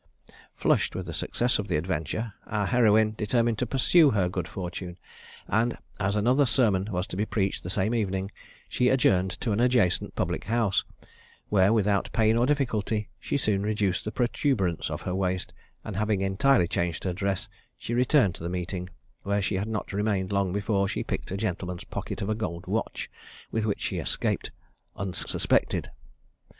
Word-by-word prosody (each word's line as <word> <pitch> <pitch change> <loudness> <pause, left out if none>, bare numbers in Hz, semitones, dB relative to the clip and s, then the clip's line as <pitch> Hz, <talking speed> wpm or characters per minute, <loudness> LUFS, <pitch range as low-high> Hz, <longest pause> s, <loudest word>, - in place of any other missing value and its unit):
Flushed - - +1
with - - -3
the - - -6
success 120 -1 0
of 105 - -3
the - - 0
adventure, 90 +6 -2
our 105 -1 0
heroine 110 -2 +4
determined 115 +1 +1
to 125 - 0
pursue 145 +5 +5
her 100 -7 +2
good 90 -2 -3
fortune; 90 -1 -6 0.5
and 115 +3 +1 0.2
as 100 +1 0
another 125 +7 +3
sermon 110 -5 +2
was 90 -1 -1
to 105 - -7
be 100 - 0
preached 100 -3 -1
the 90 - -6
same 100 +4 0
evening, 95 -3 -1 0.4
she 125 - +2
adjourned 95 -8 +3
to 110 +4 -3
an 100 - +1
adjacent 120 -7 +2
public - - -2
house, 110 -2 +1 0.7
where, 100 -1 +4
without 105 -3 +2
either - - -15
pain 110 0 +4
or 120 +2 +3
difficulty, 110 -7 0
she - - -1
soon 105 -7 +1
reduced 105 -3 0
the 110 - -3
protuberance 115 - 0
of - - -5
her 90 - -2
waist, 95 -1 -1 0.3
and 105 - -5
having 105 -2 +1
entirely 95 +1 +3
changed 85 -1 -2
her 95 - -1
dress, 100 +1 -1 0.3
she 120 - -5
returned 125 - +4
to - - -11
the 85 - -3
meeting, 90 0 -4 0.3
where 100 +1 0
she 100 +1 -1
had 95 +2 -1
not 110 -2 -4
remained 100 -2 0
long 100 -2 +1
before 100 0 +1
she 105 - -2
picked - - -4
a 95 - -3
gentleman's 90 -3 -3
pocket - - -5
of 100 - -3
a - - +2
gold 85 -6 -4
watch, - - -2 0.4
with 110 -1 0
which 100 - -1
she - - -2
escaped - - -1 0.5
unsuspected. 95 -2 0
100 Hz, 180 wpm, -27 LUFS, 95-115 Hz, 0.7 s, pursue